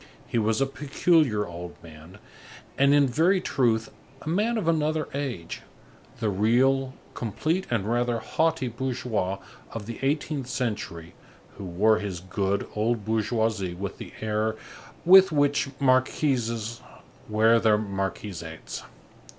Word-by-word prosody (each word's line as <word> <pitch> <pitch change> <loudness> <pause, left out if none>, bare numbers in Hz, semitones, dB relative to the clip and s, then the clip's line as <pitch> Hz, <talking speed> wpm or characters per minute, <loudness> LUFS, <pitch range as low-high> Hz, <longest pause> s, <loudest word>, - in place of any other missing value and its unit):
He 120 - -1
was 110 +1 +1
a 135 - +3
peculiar 140 -4 +2
old 85 0 -8
man, 80 +3 -13 0.6
and 140 +1 +4
in 145 0 +5
very 165 +9 +3
truth, 115 -8 +1 0.3
a 155 - -4
man 215 +7 +1
of 200 -7 -2
another 155 -1 +1
age, 130 -12 -4 0.6
the 115 - 0
real, 130 +6 +2 0.2
complete 155 - -2
and 115 -5 0
rather 120 +1 +1
haughty 160 +5 0
bourgeois 120 -6 -2 0.4
of 115 -3 -5
the 115 +1 -7
eighteenth 140 -1 -1
century, 105 -10 -4 0.4
who 100 - -7
wore 105 +5 +3
his 100 -4 -4
good, 95 +2 -1
old 110 0 0
bourgeoisie 110 -4 0
with 100 +2 -5
the - - -8
air 110 0 0 0.5
with 190 +1 +8
which 145 -1 +2
marquises 130 -4 +1 0.5
wear 110 +2 +4
their 110 -1 +4
marquisates. 95 -5 -5
115 Hz, 125 wpm, -26 LUFS, 105-140 Hz, 0.6 s, with